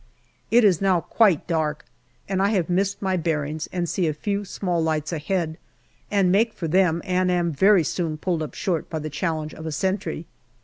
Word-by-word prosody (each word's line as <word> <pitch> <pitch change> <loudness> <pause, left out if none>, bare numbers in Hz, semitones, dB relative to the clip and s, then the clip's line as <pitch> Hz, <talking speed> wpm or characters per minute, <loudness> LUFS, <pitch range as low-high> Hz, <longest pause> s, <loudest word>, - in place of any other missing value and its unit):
It 240 +1 +5
is 195 -5 +4
now 190 -3 +3
quite 200 -7 +3
dark 155 -3 -1 0.4
and 190 -1 0
I 200 - +3
have 185 -5 0
missed 195 +3 0
my 190 -1 +1
bearings 155 -2 -2
and 175 -2 -2
see 175 0 0
a 155 - -1
few 200 +5 -2
small 180 -3 -2
lights 155 0 -1
ahead, 165 0 -2 0.5
and 195 -3 +3
make 220 +4 +3
for 165 - -4
them 170 -1 +2
and 185 0 +1
am 175 -1 +1
very 190 +4 +4
soon 160 -1 -2
pulled 170 0 -1
up 155 - -5
short 175 -4 -2
by 160 - -3
the 155 0 -5
challenge 155 -1 -2
of 160 - -8
a - - -3
sentry. 175 0 -2
175 Hz, 195 wpm, -24 LUFS, 155-190 Hz, 0.5 s, It